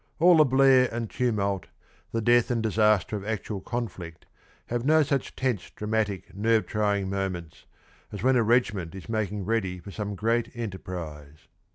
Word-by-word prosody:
All 175 Hz, +1 st, +6 dB
the 155 Hz, -, +7 dB
blare 130 Hz, -1 st, +5 dB
and 115 Hz, -1 st, -4 dB
tumult, 100 Hz, -6 st, -1 dB, 0.4 s
the 115 Hz, -, -1 dB
death 120 Hz, +1 st, +4 dB
and 115 Hz, -2 st, 0 dB
disaster 110 Hz, -1 st, +2 dB
of 100 Hz, -, -4 dB
actual 105 Hz, -1 st, -4 dB
conflict 95 Hz, -8 st, -6 dB, 0.4 s
have 120 Hz, 0 st, -2 dB
no 155 Hz, +3 st, +5 dB
such 140 Hz, -1 st, -2 dB
tense, 125 Hz, -7 st, -2 dB
dramatic, 105 Hz, -2 st, -2 dB
nerve 110 Hz, +2 st, +2 dB
trying 105 Hz, -2 st, 0 dB
moments 95 Hz, -4 st, -4 dB, 0.5 s
as 100 Hz, 0 st, -6 dB
when 130 Hz, +1 st, +4 dB
a 120 Hz, -, +4 dB
regiment 105 Hz, -7 st, +1 dB
is 95 Hz, -, -9 dB
making 105 Hz, -3 st, -2 dB
ready 95 Hz, -4 st, -1 dB
for 90 Hz, +3 st, -10 dB
some 105 Hz, 0 st, -4 dB
great 115 Hz, +3 st, 0 dB
enterprise. 85 Hz, -9 st, -7 dB
105 Hz, 160 wpm, -27 LUFS, 95-120 Hz, 0.5 s, the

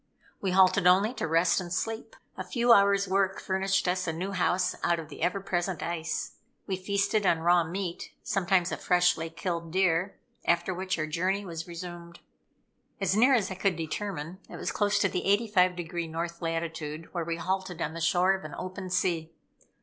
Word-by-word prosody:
We 195 Hz, -, 0 dB
halted 185 Hz, 0 st, +4 dB
only 195 Hz, +6 st, +5 dB
to 165 Hz, -, -3 dB
rest 165 Hz, +3 st, +3 dB
and 175 Hz, -1 st, -7 dB
sleep. 225 Hz, -, -3 dB, 0.2 s
A -, -, -4 dB
few 240 Hz, -1 st, +4 dB
hours 200 Hz, -1 st, +4 dB
work 195 Hz, 0 st, +1 dB
furnished 190 Hz, 0 st, 0 dB
us 185 Hz, 0 st, 0 dB
a -, -, +1 dB
new 180 Hz, +5 st, -4 dB
house 180 Hz, -1 st, +1 dB
out 170 Hz, -, +2 dB
of 160 Hz, -3 st, -7 dB
the 145 Hz, -, -10 dB
ever 190 Hz, +3 st, +1 dB
present 180 Hz, -3 st, -2 dB
ice. 165 Hz, -1 st, -3 dB, 0.3 s
We 190 Hz, -, -1 dB
feasted 200 Hz, +3 st, 0 dB
on 165 Hz, -4 st, +2 dB
raw 175 Hz, +1 st, +4 dB
meat 175 Hz, +1 st, -5 dB
sometimes 190 Hz, -3 st, +1 dB
a -, -, -2 dB
freshly 180 Hz, -2 st, +2 dB
killed 165 Hz, 0 st, -4 dB
deer; 185 Hz, +1 st, +1 dB, 0.3 s
after 170 Hz, +2 st, +1 dB
which 185 Hz, 0 st, -2 dB
our 155 Hz, -, -1 dB
journey 185 Hz, +6 st, -1 dB
was 165 Hz, -2 st, -6 dB
resumed. 170 Hz, 0 st, -8 dB, 0.8 s
As 195 Hz, -1 st, +1 dB
near 255 Hz, +5 st, +5 dB
as 200 Hz, -5 st, 0 dB
I -, -, -1 dB
could 190 Hz, 0 st, 0 dB
determine, 170 Hz, +1 st, -4 dB
it -, -, -8 dB
was -, -, -3 dB
close 205 Hz, -1 st, +1 dB
to 200 Hz, -, +4 dB
the 180 Hz, -, -2 dB, 0.3 s
85° 175 Hz, -3 st, +1 dB
north 170 Hz, +1 st, -4 dB
latitude, 165 Hz, -1 st, -4 dB
where 170 Hz, -2 st, -1 dB
we 165 Hz, 0 st, -2 dB
halted 185 Hz, 0 st, -3 dB
on 155 Hz, -1 st, -2 dB
the 165 Hz, -, -6 dB
shore 180 Hz, +3 st, +3 dB
of 190 Hz, -, -4 dB
an 155 Hz, -, -7 dB
open 185 Hz, 0 st, -6 dB
sea. 170 Hz, -3 st, 0 dB
180 Hz, 190 wpm, -28 LUFS, 170-195 Hz, 0.8 s, only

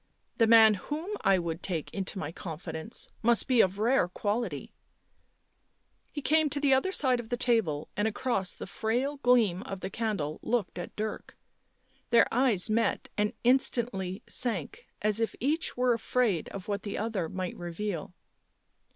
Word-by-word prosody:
" -, -, -45 dB
The 225 Hz, -, +5 dB
man 220 Hz, -1 st, +8 dB
whom 300 Hz, -, -5 dB
I 195 Hz, -, +4 dB
would 170 Hz, -1 st, -3 dB
take 165 Hz, -5 st, -4 dB
into 195 Hz, 0 st, -4 dB
my 155 Hz, -4 st, -4 dB
confidence 165 Hz, +3 st, -6 dB
must 235 Hz, -2 st, +5 dB
be 250 Hz, -3 st, +5 dB
of 190 Hz, +1 st, +1 dB
rare 230 Hz, -2 st, +2 dB
quality 205 Hz, -, -3 dB, 0.7 s
" -, -, -44 dB
He 290 Hz, -, -6 dB
came 315 Hz, +1 st, +3 dB
to 285 Hz, -, -1 dB
the 280 Hz, -2 st, +3 dB
other 265 Hz, +9 st, +2 dB
side 260 Hz, -9 st, +1 dB
of 230 Hz, -2 st, -7 dB
the 245 Hz, -, -1 dB
table 220 Hz, -, +1 dB
and 210 Hz, +1 st, +1 dB
across 215 Hz, -4 st, -1 dB
the -, -, -7 dB
frail 245 Hz, +8 st, -1 dB
gleam 235 Hz, -9 st, +3 dB
of 195 Hz, -2 st, -7 dB
the 190 Hz, -, -5 dB
candle 200 Hz, -10 st, -2 dB
looked 230 Hz, -7 st, -1 dB
at 175 Hz, -, -7 dB
Dirk. 215 Hz, 0 st, -5 dB, 0.7 s
Their 235 Hz, -, +6 dB
eyes 235 Hz, -7 st, +3 dB
met 225 Hz, +1 st, 0 dB
and 210 Hz, 0 st, 0 dB
instantly 235 Hz, -6 st, +1 dB
sank, 255 Hz, -, -1 dB, 0.2 s
as 215 Hz, 0 st, +2 dB
if 225 Hz, -, -1 dB
each 305 Hz, +4 st, -1 dB
were 250 Hz, -1 st, +3 dB
afraid 230 Hz, -6 st, 0 dB
of 195 Hz, -2 st, -8 dB
what 200 Hz, -1 st, -2 dB
the 205 Hz, -, -5 dB
other 205 Hz, -6 st, -2 dB
might 185 Hz, -1 st, -4 dB
reveal. 175 Hz, 0 st, -5 dB
220 Hz, 170 wpm, -29 LUFS, 185-245 Hz, 0.7 s, man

